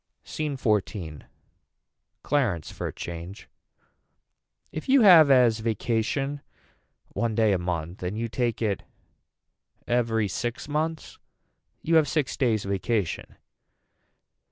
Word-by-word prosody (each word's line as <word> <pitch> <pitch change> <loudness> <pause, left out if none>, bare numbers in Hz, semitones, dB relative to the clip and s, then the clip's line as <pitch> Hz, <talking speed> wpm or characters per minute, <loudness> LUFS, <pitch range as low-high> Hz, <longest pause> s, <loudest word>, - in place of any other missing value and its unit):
SCENE 150 -3 -4
XIV. 100 - -2 1.0
Clarence 120 - 0
for - - -5
a - - -4
change. 85 +3 -8 1.2
If 155 - -7
you 270 0 +6
have 170 -8 +8
as 125 -4 +5
vacation 115 +6 -1 0.7
one 115 -2 -2
day 110 -2 +3
a 95 - +1
month 85 0 -4
and 90 +4 -3
you 115 +1 -2
take 120 0 -2
it 100 -3 0 1.1
every 115 -3 +1
six 120 +8 -4
months 155 +1 -3 0.6
you 165 0 +3
have 155 -2 +4
six 150 -1 -1
days 115 -7 +1
vacation. 100 0 -2
115 Hz, 110 wpm, -26 LUFS, 100-140 Hz, 1.2 s, have